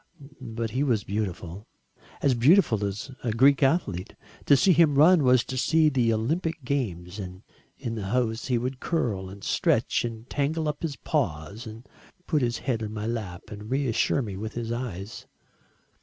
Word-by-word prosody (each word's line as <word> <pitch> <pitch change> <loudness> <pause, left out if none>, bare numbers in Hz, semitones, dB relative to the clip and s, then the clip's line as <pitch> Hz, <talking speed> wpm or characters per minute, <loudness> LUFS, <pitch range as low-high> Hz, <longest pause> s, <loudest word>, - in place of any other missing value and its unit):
But 115 -2 -4
he 130 +5 -1
was 115 -8 +1
beautiful, 100 -1 -4 0.6
as 140 - +4
beautiful 120 - +4
as 100 +7 -4
a 120 - 0
Greek 135 +6 +4
athlete 135 - 0 0.3
to 140 - +7
see 185 +6 +5
him 155 -3 +4
run 165 +3 +7
was 125 -2 +5
to 130 - -5
see 160 +2 +4
the 125 -5 +2
Olympic 160 +8 -1
games, 105 -9 -3
and 95 0 -8 0.3
in 120 -5 -4
the 105 -4 -4
house 115 0 -1
he 125 -3 +2
would 125 +2 -3
curl 110 - -1
and 100 +1 -11
stretch - - +1
and 115 0 -6
tangle 155 +3 -1
up 150 -1 -3
his 160 -4 -3
paws, 100 +2 -2
and 110 +3 -10 0.4
put 150 -4 +1
his 120 -1 0
head 120 -4 -2
on 105 -1 -4
my 105 0 -4
lap 105 -7 -5
and 105 +1 -8
reassure 135 0 +1
me 100 -4 -5
with 110 +3 -5
his 115 -1 -4
eyes. 115 -4 -5
120 Hz, 175 wpm, -26 LUFS, 105-140 Hz, 0.6 s, to